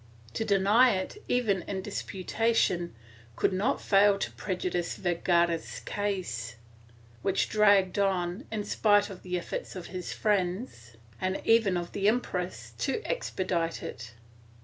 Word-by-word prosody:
To -, -, -1 dB
deny 210 Hz, +4 st, +4 dB
it, 190 Hz, -, -5 dB
even 220 Hz, -7 st, +1 dB
in 190 Hz, -2 st, -3 dB
disputation, 195 Hz, -, 0 dB, 0.4 s
could -, -, +1 dB
not 215 Hz, +9 st, +1 dB
fail 200 Hz, 0 st, +4 dB
to -, -, -3 dB
prejudice 180 Hz, -2 st, -2 dB
Ver 175 Hz, -2 st, 0 dB
gara's 170 Hz, -1 st, +1 dB
case, 175 Hz, -, -3 dB, 0.7 s
which 195 Hz, -1 st, +1 dB
dragged 200 Hz, -3 st, +4 dB
on, 190 Hz, +3 st, 0 dB
in 215 Hz, -2 st, -2 dB
spite 205 Hz, -1 st, +3 dB
of 185 Hz, -, -10 dB
the 180 Hz, -1 st, -2 dB
efforts 175 Hz, -, -5 dB
of 180 Hz, -2 st, -6 dB
his 180 Hz, -1 st, -4 dB
friends, 185 Hz, -, -1 dB, 0.3 s
and 185 Hz, +1 st, -1 dB
even 225 Hz, -5 st, +4 dB
of 175 Hz, 0 st, -4 dB
the 200 Hz, 0 st, 0 dB
empress, 190 Hz, -6 st, -1 dB
to 440 Hz, -, -1 dB
expedite 180 Hz, -, -2 dB
it. 115 Hz, 0 st, -8 dB
190 Hz, 135 wpm, -29 LUFS, 175-205 Hz, 0.7 s, deny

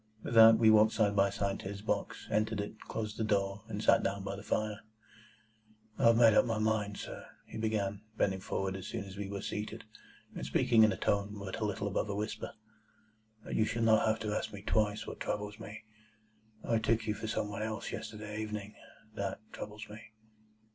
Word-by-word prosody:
With -, -, -4 dB
that 115 Hz, 0 st, +9 dB
we 110 Hz, -1 st, +6 dB
walked 110 Hz, 0 st, +6 dB
side 105 Hz, -2 st, +2 dB
by 100 Hz, 0 st, +4 dB
side 100 Hz, 0 st, -2 dB
to -, -, -6 dB
his 100 Hz, +1 st, -6 dB
box, -, -, -2 dB
entered 110 Hz, 0 st, +1 dB
it, 105 Hz, +2 st, -5 dB
closed 110 Hz, -1 st, -4 dB
the -, -, 0 dB
door, 100 Hz, -1 st, 0 dB
and -, -, -4 dB
sat -, -, +5 dB
down 100 Hz, 0 st, -2 dB
by 100 Hz, 0 st, -3 dB
the 100 Hz, -, -8 dB
fire. 110 Hz, 0 st, -1 dB, 1.2 s
"I -, -, +3 dB
have 115 Hz, 0 st, +6 dB
made 115 Hz, -2 st, +7 dB
up -, -, +6 dB
my 115 Hz, -2 st, -1 dB
mind, 110 Hz, -2 st, 0 dB
sir," -, -, -7 dB, 0.2 s
he -, -, -8 dB
began, 105 Hz, -2 st, -1 dB, 0.2 s
bending 95 Hz, -1 st, +1 dB
forward 95 Hz, 0 st, -2 dB
as 95 Hz, -1 st, -6 dB
soon -, -, -4 dB
as 95 Hz, -1 st, -10 dB
we 100 Hz, -1 st, -5 dB
were 100 Hz, -1 st, -4 dB
seated, 105 Hz, +2 st, -4 dB, 0.5 s
and -, -, -6 dB
speaking 115 Hz, -3 st, +4 dB
in 110 Hz, -, +6 dB
a -, -, -3 dB
tone 100 Hz, +1 st, 0 dB
but 100 Hz, +1 st, -5 dB
a 110 Hz, -, 0 dB
little 105 Hz, 0 st, -2 dB
above 100 Hz, +2 st, -1 dB
a 100 Hz, -, -2 dB
whisper, 105 Hz, +2 st, -4 dB, 0.9 s
"that -, -, -5 dB
you 110 Hz, -, +3 dB
shall 115 Hz, +1 st, -1 dB
not 110 Hz, 0 st, +5 dB
have 110 Hz, 0 st, +2 dB
to 105 Hz, -1 st, -2 dB
ask 110 Hz, -, -2 dB
me 100 Hz, -1 st, -9 dB
twice 105 Hz, 0 st, +1 dB
what -, -, -7 dB
troubles 105 Hz, +1 st, -3 dB
me. 110 Hz, 0 st, -9 dB, 0.8 s
I 115 Hz, -1 st, +2 dB
took 115 Hz, 0 st, +1 dB
you 105 Hz, -, 0 dB
for 110 Hz, +1 st, -5 dB
some 110 Hz, -1 st, -1 dB
one 105 Hz, -, -4 dB
else 110 Hz, 0 st, -3 dB
yesterday 105 Hz, -1 st, -5 dB
evening. 105 Hz, -1 st, -5 dB, 0.4 s
That 100 Hz, -1 st, -3 dB
troubles 105 Hz, 0 st, -7 dB
me." 105 Hz, +1 st, -10 dB
105 Hz, 210 wpm, -32 LUFS, 100-110 Hz, 1.2 s, that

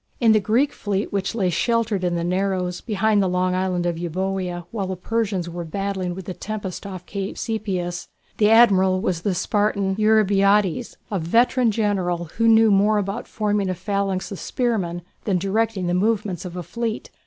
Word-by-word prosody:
In 230 Hz, -3 st, +5 dB
the 215 Hz, -, +5 dB
Greek 235 Hz, +8 st, +1 dB
fleet 200 Hz, -1 st, -3 dB
which 200 Hz, +2 st, -1 dB
lay 190 Hz, -5 st, +1 dB
sheltered 225 Hz, 0 st, 0 dB
in 175 Hz, -1 st, 0 dB
the 170 Hz, -, -1 dB
narrows, 180 Hz, 0 st, -1 dB
behind 215 Hz, -1 st, +1 dB
the 190 Hz, -, +2 dB
long 180 Hz, 0 st, +1 dB
island 185 Hz, -1 st, 0 dB
of 170 Hz, -1 st, -1 dB
Euboea 180 Hz, 0 st, -3 dB
while 200 Hz, -4 st, -3 dB
the 190 Hz, -, -3 dB
Persians 195 Hz, -2 st, -2 dB
were 170 Hz, 0 st, -5 dB
battling 190 Hz, +1 st, -3 dB
with 190 Hz, -1 st, -8 dB
the 185 Hz, -, -5 dB
tempest 200 Hz, 0 st, -6 dB
off 185 Hz, -2 st, -8 dB
Cape 195 Hz, -1 st, -4 dB
Sepias, 185 Hz, -6 st, -3 dB, 0.3 s
the 210 Hz, -1 st, +4 dB
Admiral 190 Hz, -5 st, +5 dB
was 180 Hz, -3 st, -1 dB
the 190 Hz, 0 st, -1 dB
Spartan 200 Hz, +1 st, 0 dB
Eurybiades, 210 Hz, 0 st, +3 dB
a 200 Hz, -, 0 dB
veteran 235 Hz, +8 st, +3 dB
General, 195 Hz, -5 st, 0 dB
who 230 Hz, 0 st, +3 dB
knew 225 Hz, -1 st, +6 dB
more 205 Hz, +2 st, +4 dB
about 205 Hz, +3 st, -3 dB
forming 210 Hz, -3 st, -1 dB
a 185 Hz, -, -1 dB
phalanx 195 Hz, 0 st, -2 dB
of 195 Hz, -, -6 dB
spearmen 190 Hz, -9 st, -2 dB, 0.2 s
than 195 Hz, -4 st, +1 dB
directing 195 Hz, +1 st, 0 dB
the 175 Hz, -, 0 dB
movements 200 Hz, -2 st, 0 dB
of 180 Hz, -1 st, -7 dB
a 180 Hz, -, -4 dB
fleet. 230 Hz, +3 st, -4 dB
195 Hz, 180 wpm, -22 LUFS, 180-215 Hz, 0.3 s, knew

